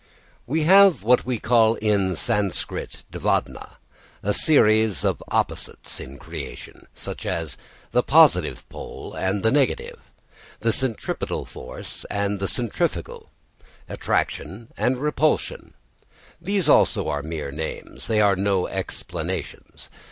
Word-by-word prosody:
We 155 +5 0
have 190 - +6
what 125 +2 +3
we 125 -2 0
call 115 0 +4
in 100 -4 +1
Sanskrit 100 +2 -2
dvandva, - - -2 0.5
a 105 - +1
series 110 - +3
of - - 0
opposites - - -2
in 70 +2 -9
creation; - - -9
such - - -5
as, 80 -5 -2 0.4
the - - +3
positive - - +4
pole - - -9
and 95 +1 -1
the 110 - +3
negative, 140 -3 0 0.6
the 115 0 +2
centripetal 130 -3 -2
force 65 - -6
and 100 0 -1
the 100 - -1
centrifugal, 120 +1 -2 0.6
attraction 100 +10 -2
and 125 +1 +1
repulsion. 150 +1 0 0.7
These 190 -1 0
are - - +8
also 75 - 0
mere 75 -2 -5
names, 80 +2 -5
they 110 -1 +2
are 100 -2 +4
no 95 -1 +1
explanations. - - -5
105 Hz, 120 wpm, -23 LUFS, 95-125 Hz, 0.7 s, are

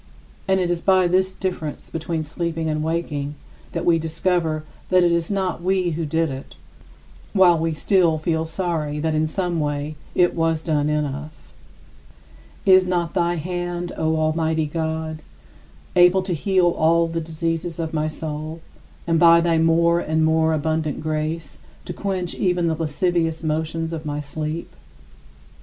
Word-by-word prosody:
And 190 0 +3
it 175 -1 0
is 170 -1 -1
by 185 -1 +4
this 185 +2 +2
difference 180 -6 -5
between 165 0 -2
sleeping 165 +1 -3
and 155 -1 -1
waking 150 -3 -2 0.4
that 170 0 -2
we 170 -1 +4
discover 160 -1 0 0.3
that 185 -1 +5
it 175 - +4
was 170 -1 0
not 190 -4 -1
we 185 -1 +1
who 160 0 -2
did 160 0 0
it, 135 0 -8 0.8
while 180 -4 +5
we 165 0 0
still 170 -1 +3
feel 160 0 -1
sorry 160 -3 -2
that 160 +1 0
in 155 0 +1
some 175 0 -1
way 145 0 -2 0.2
it 175 -1 +4
was 165 -1 0
done 150 -3 +1
in 150 0 +1
us. 145 - -8 1.1
42. 195 - +5
Is 185 0 +6
not 175 -2 -1
thy 175 -1 +1
hand, 175 +1 -3
O 160 0 0
Almighty 160 0 +1
God, 160 0 -3 0.7
able 180 +1 +5
to 185 -1 -2
heal 185 +2 +2
all 165 +1 +3
the 165 0 -3
diseases 165 +1 -3
of 165 -1 -3
my 155 -1 0
soul 155 +1 -5 0.5
and, 165 -1 +2
by 170 0 +7
thy 165 -1 +2
more 170 +1 +3
and 160 -1 +1
more 160 0 +3
abundant 155 0 -1
grace, 155 +1 -3 0.3
to 180 - -5
quench 185 -1 -3
even 180 -2 +1
the 165 - +2
lascivious 165 +1 0
motions 160 +1 -2
of 155 -1 -5
my 145 0 -2
sleep? 155 +3 -5
165 Hz, 160 wpm, -22 LUFS, 155-175 Hz, 1.1 s, by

